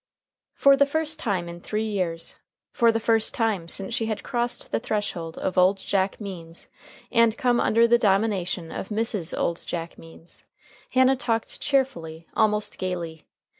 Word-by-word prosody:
For 275 0 +6
the 280 +1 +4
first 315 +1 0
time 195 - -1
in 170 0 -8
three 215 +3 -2
years, 180 -6 -2 0.3
for 235 -3 +4
the 225 - 0
first 225 -1 +2
time 215 -7 0
since 195 +5 -3
she 225 -1 0
had 215 -2 -3
crossed 240 -1 -1
the - - +1
threshold 190 -7 -3
of 185 0 0
"Old 185 +2 +5
Jack 195 0 -1
Means" 175 -5 -8 0.4
and 230 -2 +4
come 245 -1 +2
under 230 +1 +4
the 240 0 +4
domination 195 -5 +1
of - - -5
Mrs. 210 -5 -1
Old 170 - -1
Jack 170 -1 -5
Means, 165 +1 -13 0.5
Hannah 260 +1 +4
talked 230 -3 -2
cheerfully, 200 - -1
almost 210 -1 +1
gayly. 170 -4 -4
210 Hz, 160 wpm, -25 LUFS, 175-230 Hz, 0.5 s, For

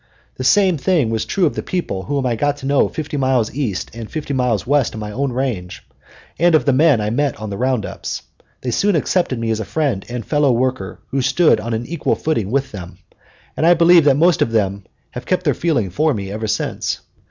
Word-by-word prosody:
The 130 - -4
same 185 +3 +3
thing 150 -8 +1
was 110 -1 -1
true 190 - +1
of 150 - +1
the - - -3
people 170 - -3
whom 140 +5 -2
I 120 -2 +1
got 145 +4 0
to 135 - -9
know 140 0 +2
fifty 150 -1 -5
miles 130 -5 +1
east 120 -9 -3
and 115 -1 -8
fifty 150 -3 -4
miles 125 -6 0
west 140 -2 +1
of - - -6
my 105 -1 -5
own 135 +4 -2
range, 120 -9 -3 0.6
and 170 0 +4
of 155 - +2
the 140 - +3
men 145 -2 +4
I 105 0 -1
met 140 +3 0
on 110 -1 -6
the 100 - -4
round 130 -3 0
ups. - - -6 0.4
They 125 - -2
soon 200 - +2
accepted 160 -3 0
me 115 -1 -2
as 110 - -1
a - - -2
friend 135 -5 -1
and 120 -3 -5
fellow 145 -3 +2
worker 130 +2 -1
who 135 - -1
stood 135 -1 +3
on 115 +1 -3
an 115 +2 -4
equal 165 +1 -1
footing 115 -11 -1
with 135 +3 -1
them, 90 -4 -9 0.6
and - - -2
I 175 +2 +6
believe 170 0 +6
the 140 -2 +5
most 170 +3 +3
of 115 - +2
them 100 -3 0 0.3
have - - -8
kept - - 0
their - - +2
feeling 130 - 0
for 150 - +1
me 100 -2 -5
ever 110 +2 -4
since. - - -2
130 Hz, 230 wpm, -19 LUFS, 110-150 Hz, 0.6 s, I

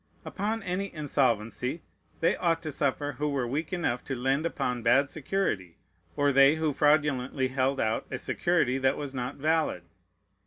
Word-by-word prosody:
Upon 215 +2 -3
any 185 +2 -2
insolvency, 130 -1 0 0.4
they 165 - +3
ought 165 -2 0
to 155 - -4
suffer 145 +1 -1
who 150 0 0
were 135 -3 -1
weak 150 +6 -3
enough 170 -9 -1
to 135 - -3
lend 135 +6 0
upon 125 -6 -2
bad 130 +5 +3
security, 130 - -2 0.4
or 145 0 +3
they 140 +2 +6
who 160 -2 0
fraudulently 145 -3 +2
held 130 +1 0
out 110 0 0
a - - -3
security 135 -7 +1
that 130 +1 +2
was 145 -2 -5
not 125 -1 -4
valid. 155 - 0
140 Hz, 160 wpm, -28 LUFS, 130-160 Hz, 0.4 s, they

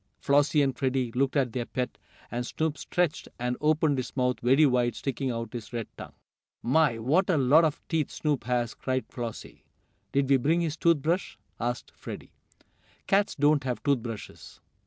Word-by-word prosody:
Flossie 145 +1 +3
and 135 -2 0
Freddie 130 -2 0
looked 135 +3 0
at 130 -5 +1
their 120 -2 -2
pet, 125 -1 -3 0.3
and 120 +1 -2
Snoop 155 +4 -2
stretched, 175 -2 -1
and 125 0 -1
opened 150 -2 +2
his 130 +2 -6
mouth 125 -1 +1
very 135 +6 +5
wide, 125 -4 +2
sticking 135 0 -2
out 115 -2 -4
his 120 -3 -7
red 115 -3 -4
tongue. - - -10 0.5
"My! 135 -1 +3
What 150 +13 +2
a 175 - +3
lot 140 +5 +5
of 155 -3 +1
teeth 160 -4 0
Snoop 145 -7 -1
has!" 120 -1 0
cried 130 -1 -2
Flossie. 120 -3 -7 0.5
"Did 140 -1 +2
we 135 0 +5
bring 160 +7 +2
his 160 -3 -1
tooth 165 -4 +2
brush?" 175 +4 -1 0.2
asked 120 +1 -3
Freddie. - - -9 0.7
"Cats 200 +1 +2
don't 145 0 +3
have 125 -2 -3
tooth 140 -3 +3
brushes!" 115 -2 -8
135 Hz, 180 wpm, -28 LUFS, 125-150 Hz, 0.7 s, very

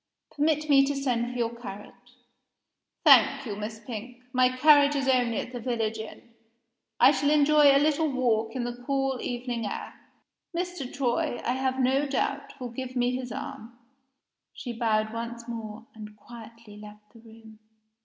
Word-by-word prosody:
"Permit 305 0 0
me 275 -2 +6
to 285 +1 -2
send 245 -3 -1
for 250 - -6
your 235 -1 -1
carriage." 240 +3 -11 0.9
"Thank 275 0 +6
you, 210 -4 -4
Miss 215 +1 -6
Pink. 245 +1 -8
My 255 0 +4
carriage 290 +2 +5
is 275 -1 -1
only 245 -4 +2
at - - -4
the 245 - -6
village 225 -2 -2
inn. 220 +2 -9 0.7
I - - +7
shall 285 0 +1
enjoy 300 0 +5
a 275 -1 +7
little 305 +2 +2
walk 235 -3 0
in 250 - -2
the 240 0 -6
cool 270 -2 0
evening 240 -2 -3
air. - - -6 0.6
Mr. 355 -7 -4
Troy, 245 -2 -1
I - - +1
have 260 0 -1
no 265 +3 +2
doubt, 280 0 -3
will 250 -2 -6
give 255 +1 -6
me 245 0 +1
his 250 -1 -5
arm." 230 +2 -8 0.8
She 245 -3 -6
bowed 220 -2 0
once 235 +1 -6
more, 225 -1 -7
and 210 -1 -11
quietly 230 -1 -13
left 210 +1 -14
the 230 - -16
room. 225 -1 -16
245 Hz, 165 wpm, -27 LUFS, 225-270 Hz, 0.9 s, I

